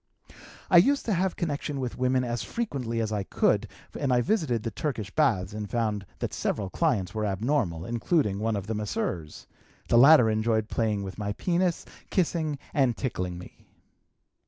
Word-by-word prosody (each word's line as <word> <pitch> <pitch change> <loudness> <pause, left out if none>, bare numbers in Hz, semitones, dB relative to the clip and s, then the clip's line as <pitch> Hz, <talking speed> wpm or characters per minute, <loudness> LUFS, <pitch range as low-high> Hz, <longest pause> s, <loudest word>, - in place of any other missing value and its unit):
"I 180 - +8
used 275 +11 +4
to 220 - +1
have 185 +1 0
connection 145 -3 -3
with 125 -2 -3
women 130 0 +1
as 120 -1 -2
frequently 135 - -3
as 110 -1 -2
I 105 -1 -1
could, 95 - +1 0.3
and 140 -3 -1
I - - +4
frequently 120 - +3
visited 150 - 0
the 115 - -3
Turkish 110 -6 -3
baths 105 -10 +1
and 105 -1 -5
found 105 -4 -1
that - - -4
several 100 -2 -2
clients 105 - 0
were 110 -1 -2
abnormal, 100 - 0
including 115 - 0
one 110 +1 0
of 100 -2 -3
the 110 - -3
masseurs; 90 -6 -3 0.4
the 120 - +6
latter 140 -2 +8
enjoyed 110 0 +1
playing 105 -3 0
with 95 +1 -7
my 100 -1 -2
penis, 175 - 0 0.2
kissing 160 -5 0 0.2
and 130 -5 +2
tickling 90 -9 -3
me. 90 - -13
115 Hz, 175 wpm, -27 LUFS, 105-150 Hz, 0.4 s, I